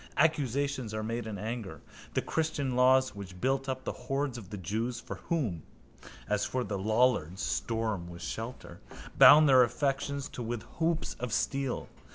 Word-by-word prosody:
Accusations 140 -5 +1
are 110 - -2
made 115 +1 -3
in 105 -2 -5
anger. 105 -6 -5 0.4
The - - +1
christian 155 -5 -1
laws 130 +1 +4
which 95 -3 -9
built 135 +3 0
up 130 0 -3
the - - -2
hoards 135 +1 -2
of 105 -6 -8
the 105 - -6
jews 110 +6 -2
(for - - -7
whom, 120 - 0 0.7
as 105 0 +1
for 130 -1 -1
the 100 -4 -3
lollards, 110 -4 +1
storm 110 -6 -1
was 85 0 -9
shelter) 115 +7 -6 0.4
bound 150 +1 +9
their 130 -2 +7
affections 140 +2 0
too - - -8
with 120 -1 -3 0.2
hoops 165 0 0
of 125 -1 -3
steel. 135 +3 -1
125 Hz, 165 wpm, -30 LUFS, 110-135 Hz, 0.7 s, bound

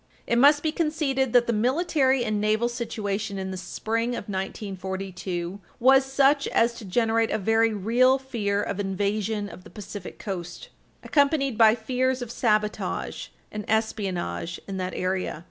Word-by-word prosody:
It 235 - +2
must 290 +3 +6
be 315 - +1
conceded 300 -6 0
that 245 -1 +5
the 235 - 0
military 265 +2 +2
and 215 -2 -1
naval 215 +2 +2
situation 215 -4 -3
in 190 0 -4
the - - -4
spring 225 +6 -2
of 210 - -6
1942 190 -2 -4 0.2
was 265 +2 +5
such 280 +1 +3
as 235 +1 +2
to 215 - -9
generate 225 +3 +1
a - - 0
very 225 +2 +2
real 235 +6 +3
fear 210 -6 -2
of 200 - -4
invasion 205 +2 -1
of 185 - -11
the - - -13
Pacific 205 0 -8
Coast, 175 -4 -6 0.3
accompanied 280 -3 +2
by 220 0 +6
fears 255 +2 -1
of 235 - -7
sabotage 215 -3 -1 0.2
and 210 0 -5
espionage 190 - -2
in 195 -1 -4
that 185 -1 -3
area. 185 -3 -2
220 Hz, 155 wpm, -25 LUFS, 195-255 Hz, 0.3 s, must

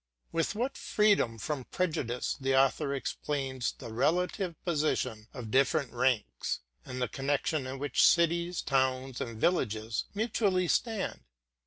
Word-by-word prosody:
With 165 +4 0
what 250 +5 -2
freedom 205 - +2
from 135 +3 -3
prejudice 145 -9 -1
the 135 0 +2
author 135 +1 +3
explains 135 -2 -2
the 115 - -9
relative 180 - +1
position 140 -9 0
of 120 -5 -7
different 140 +1 +2
ranks, 115 - 0 0.2
and 130 -1 -6
the 125 - +1
connection 145 +2 -1
in 130 +1 -5
which 140 -1 +2
cities, 170 +1 +2
towns, 130 -1 0
and 115 -2 -5
villages 110 - 0
mutually 200 -4 +1
stand! 220 - 0
135 Hz, 130 wpm, -30 LUFS, 125-175 Hz, 0.2 s, author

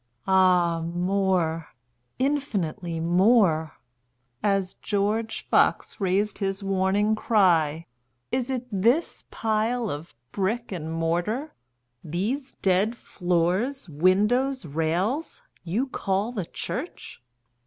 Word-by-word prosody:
Ah 180 -3 +4
more—infinitely 175 - -2
more;(As 160 - 0
George 210 +2 -2
Fox - - +2
rais'd 195 +2 0
his 195 0 -2
warning 195 +2 +1
cry, 170 -8 +2 0.5
"Is 255 0 -1
it 255 -2 -2
this 230 - +1
pile 225 +1 0
of 145 0 -7 0.2
brick 215 +5 -2
and 160 -4 -4
mortar—these 170 - -3
dead 195 +5 +2
floors, 180 +10 -1
windows, 210 - +2
rails—you 185 - -2
call 200 0 -1
the 205 -8 -3
church? - - -6
190 Hz, 80 wpm, -25 LUFS, 165-220 Hz, 0.5 s, Ah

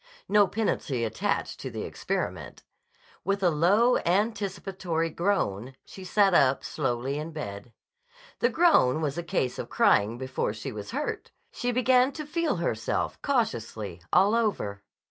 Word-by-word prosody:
No 205 -1 +5
penalty 175 - -1
attached 110 - -2
to - - -5
the - - -5
experiment. - - -4 0.6
With 195 +1 -1
a 175 - +4
low, 200 +11 +4
anticipatory 190 -4 -1
groan 135 - -1
she 190 - -11
sat 195 +1 +3
up 135 -5 +4
slowly 135 0 -2
in 155 +2 -5
bed. 100 -8 -7 0.7
The 240 - +3
groan 235 - +4
was 150 +1 -2
a - - -1
case 130 -6 -1
of - - -5
crying 105 +3 +3
before 130 -4 -2
she 110 +5 -6
was 105 -2 -7
hurt. - - -3 0.2
She 245 - -2
began 255 +1 +3
to 305 - -6
feel 335 +2 0
herself - - -2
cautiously 110 - -2
all 200 +3 +5
over. 200 - -1
170 Hz, 145 wpm, -27 LUFS, 125-210 Hz, 0.7 s, No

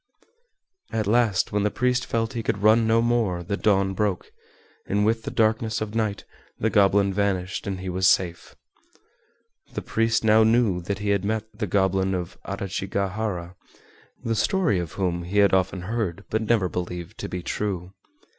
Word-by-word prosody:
At 110 -1 -1
last, 110 -3 +2
when 105 - +1
the 105 - +2
priest 125 +3 0
felt 115 +1 -1
he 115 - -2
could 100 -2 -2
run 110 +1 +5
no 115 +1 +3
more, 115 -7 +1
the 100 +4 -2
dawn 100 -2 +2
broke, 100 -2 -2 0.6
and 105 +1 +1
with 115 +1 +1
the - - -5
darkness 110 0 +1
of 110 -1 -4
night 110 -3 -1 0.3
the 110 - 0
goblin 100 -1 +4
vanished 95 -1 -1
and 95 -2 -3
he 95 - -6
was 95 +1 +1
safe. 85 -2 +1 1.2
The - - -3
priest 115 0 +1
now 110 0 +5
knew 110 -5 +3
that 100 +3 -3
he 105 +1 -3
had 100 -2 +1
met 110 +1 -1
the 105 - -3
Goblin 95 0 +1
of 90 -1 -5
Adachigahara, 100 -1 -3 0.7
the 115 - 0
story 175 - +1
of 85 -3 -5
whom 90 -3 -1
he 90 +4 -4
had 100 -2 +5
often 95 0 +1
heard 100 -2 -3
but 110 - +1
never 110 -3 +2
believed 90 +2 -5
to - - -5
be 90 -1 -5
true. 95 -3 -3
100 Hz, 175 wpm, -24 LUFS, 95-110 Hz, 1.2 s, run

